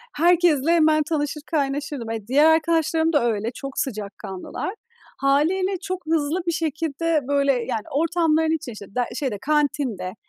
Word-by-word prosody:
herkesle 335 -2 +3
hemen 310 -2 +4
tanışır, 300 -1 -2
kaynaşırdım. 280 -4 -2
E, 220 -2 -5
diğer 290 +5 +4
arkadaşlarım 325 0 +1
da 285 -5 +3
öyle. 215 +3 -3
Çok 275 -1 -7
sıcakkanlılar. 200 - -5 0.4
Hâliyle 355 +8 +2
çok 370 -3 -5
hızlı 320 +2 0
bir 340 - +2
şekilde 320 -1 -1
böyle 280 -1 +3
yani 235 -3 -2
ortamların 320 +1 +2
içinde, 280 -7 -6
işte 200 -2 -12
der 245 -1 +1
şeyde, 255 -8 -2
kantinde, 280 -10 0
295 Hz, 140 wpm, -23 LUFS, 265-325 Hz, 0.4 s, hemen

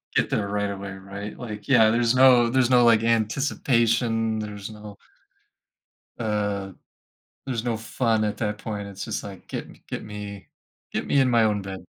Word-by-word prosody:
get - - +2
there 100 - 0
right 105 0 -1
away, 100 0 -6
right? 100 +2 -8
Like, 105 -4 -7
yeah, 115 -5 +6
there's 115 +1 +2
no 125 -2 +6
there's 125 0 +2
no, 125 -1 +5
like, 115 -1 +5
anticipation, 115 -1 +1
there's 105 -1 -6
no 105 -1 -10 1.2
uh, 105 -3 -2 0.7
there's 125 -4 -2
no 120 -2 -1
fun 115 0 0
at 105 -1 -1
that 105 -2 -2
point, 105 -2 -5
it's 100 -1 -7
just - - -4
like, 100 -3 -10
"Get - - -5
me - - -17
get - - -5
me 105 -1 -8 0.5
get - - -2
me 140 - +3
in 130 -1 +4
my 120 -2 +4
own 105 -2 +1
bed." 95 -2 -8
110 Hz, 175 wpm, -25 LUFS, 105-115 Hz, 1.2 s, yeah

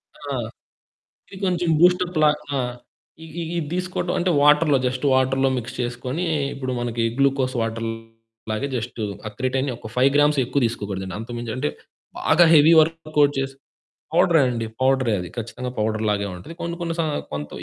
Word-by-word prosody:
ఆ! - - -6 1.0
ఇది 190 - -8
కొంచెం 175 -1 0
బూస్టప్‌లా. 175 -3 +4 0.3
ఆ! - - +1 0.7
ఇ - - -9 0.2
ఇది 165 +2 -5 0.2
తీసుకోవటం 180 0 -2
అంటే 180 0 +1
వాటరులో 150 0 +5
జస్ట్ 130 +2 -3
వాటరులో 130 +1 +2
మిక్స్ 125 +2 -5
చేసుకొని 125 +7 -3 0.3
ఇప్పుడు 130 -2 -4
మనకి 120 -1 -2
గ్లూకోజ్ 135 -1 +2
వాటరులాగే 115 +1 -5
జస్ట్ 120 0 -5 0.3
ఆ - - -3
క్రిటైన్ 130 +1 0
ఒక 110 - -9
5 130 +2 +4
గ్రామ్సే 145 -1 +4
ఎక్కువ 135 +3 0
తీసుకోకూడదండి. 100 -4 -4
అంతకుమించి 120 0 -5
అంటే 145 +4 -1 0.5
బాగా 175 - +4
హెవీ 160 +2 +7
వర్క్ 155 -1 -3
అవుట్ 145 0 +4
చేసి 135 0 -3 0.6
పౌడరే 165 -4 +5
అండి 115 -2 -2
పౌడరే 130 -3 +2
అది. 90 - -6
ఖచ్చితంగా 120 +2 -5
పౌడర్ 110 0 0
లాగే 100 -1 0
ఉంటది. 90 - -10
కొన్ని 170 0 -3
కొన్ని 165 -1 -2
స - - +2 0.3
కొంత 75 0 -4
130 Hz, 155 wpm, -23 LUFS, 115-155 Hz, 1.0 s, హెవీ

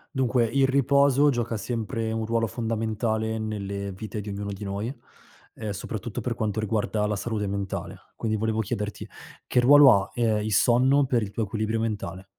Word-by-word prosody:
Dunque, 125 -2 +2
il 135 +3 +2
riposo 140 +1 +4
gioca 120 -3 -1
sempre 110 0 -3
un 110 0 -2
ruolo 115 0 0
fondamentale 110 0 -2
nelle 100 -2 -4
vite 105 +2 -6
di 105 - -7
ognuno 100 0 -4
di 100 +1 -7
noi. 100 +4 -3 0.6
Ehm, 110 -1 -6
soprattutto 105 +3 -5
per 120 +1 -2
quanto 110 -3 -2
riguarda 110 0 0
la 105 0 0
salute 105 0 -2
mentale. 100 -1 -4 0.2
Quindi 110 -1 -1
volevo 110 +1 -1
chiederti 105 0 -4 0.4
che - - +2
ruolo 135 -4 +7
ha, - - -12
ehm, 110 -3 +1
il 110 0 -2
sonno 130 +6 +4
per 125 -3 +1
il 105 - -3
tuo 115 - -2
equilibrio 110 +2 -2
mentale? 100 -4 -4
110 Hz, 175 wpm, -26 LUFS, 105-120 Hz, 0.6 s, ruolo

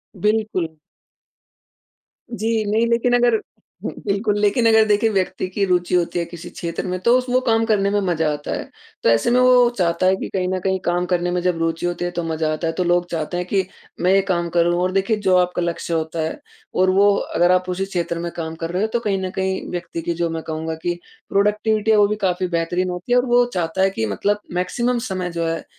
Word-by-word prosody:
बिल्कुल। 200 -5 -1 1.6
जी 225 0 0
नहीं, 225 +2 +3
लेकिन 235 +1 +2
अगर 240 -1 +4 0.5
हुँ - - -2
बिल्कुल, 205 +1 0
लेकिन 210 +3 +2
अगर 220 -1 +5
देखिए 210 +2 +3
व्यक्ति 185 -2 -1
की 195 +2 -2
रुचि 180 -1 +1
होती 175 0 +1
है 170 - 0
किसी 170 0 -9
क्षेत्र 170 -1 -5
में 180 0 -2
तो 235 +6 +4
उस 255 - -2
वो 255 - +3
काम 225 -2 +2
करने 200 -3 +2
में 205 - +2
मज़ा 165 -4 0
आता 145 0 -6
है। - - -3 0.4
तो - - +4
ऐसे 115 - +3
में 250 - +4
वो 250 -1 +6
चाहता 170 0 +1
है 190 +1 +4
कि - - -5
कहीं 185 -1 -1
न 185 - -1
कहीं 190 0 0
काम 175 +1 +1
करने 175 -1 0
में 180 - 0
जब 180 -1 0
रुचि 165 +1 -1
होती 175 0 -2
है 175 - -2
तो 175 -1 -3
मज़ा 160 -1 -1
आता 165 +2 -2
है। 165 - -1
तो 185 - -1
लोग 175 0 +2
चाहते 165 +1 -3
हैं 180 - -2
कि 190 -1 +1 0.4
मैं 185 +1 +3
ये 195 - +5
काम 170 -1 0
करूँ। 175 0 +2
और 185 - +1
देखिए 195 +3 +1
जो 190 -3 +2
आपका 180 0 +1
लक्ष्य 170 0 -3
होता 160 0 -2
है 160 - -3 0.4
और 185 0 +3
वो 200 +2 +5
अगर 175 +2 +1
आप 185 0 +2
उसी 185 +2 -1
क्षेत्र 170 -3 -3
में 170 0 -4
काम 160 -1 -4
कर 165 +1 -5
रहे 185 +3 -1
हो 220 - +2
तो 235 - +2
कहीं 205 -4 -1
न 185 - -3
कहीं 190 0 -1
व्यक्ति 170 -1 -4
की 170 - -2
जो 170 0 -1
मैं 165 0 -4
कहूँगा 160 0 -4
कि 175 0 -2 0.3
प्रोडक्टिविटी 210 +2 +1
है 215 - +5
वो 205 -1 +5
भी 210 - -1
काफ़ी 185 0 0
बेहतरीन 175 +1 -1
होती 180 +6 -6
है 245 - +5
और 250 - +3
वो 245 0 +4
चाहता 175 +1 -1
है 195 - +4
कि 110 -13 -2
मतलब 200 - 0
मैक्सिमम 235 +7 0
समय 185 -1 -2
जो 170 0 -2
है, 165 0 -2
185 Hz, 240 wpm, -21 LUFS, 170-205 Hz, 1.6 s, वो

